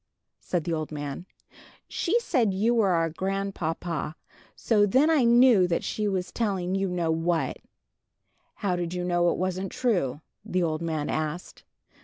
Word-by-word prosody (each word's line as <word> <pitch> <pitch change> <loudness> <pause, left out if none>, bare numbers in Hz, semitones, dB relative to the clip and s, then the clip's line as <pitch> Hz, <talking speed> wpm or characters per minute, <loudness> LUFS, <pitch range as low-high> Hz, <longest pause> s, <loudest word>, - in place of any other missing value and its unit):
said 175 -3 -2
the 170 0 -2
old 155 -1 -3
man. 145 +3 -6 0.6
"She 410 +7 0
said 235 - +1
you 220 +5 +2
were 220 -5 +3
our 165 -2 +1
grandpapa. 175 -4 -3 0.4
So 210 -3 +2
then 275 +10 +4
I 290 -6 +4
knew 235 -5 +6
she 210 -1 -2
was 185 -2 -2
telling 190 -5 -1
you 195 0 0
know 175 -2 0
what." 165 +1 0 1.0
"How 190 -3 -1
did 175 0 -3
you 180 - -2
know 175 -1 +2
it - - -1
wasn't 185 +1 -2
true?" 175 - 0 0.2
the 185 -1 -1
old 155 -1 -1
man 160 -3 -2
asked. 155 +3 -4
180 Hz, 155 wpm, -26 LUFS, 165-205 Hz, 1.0 s, knew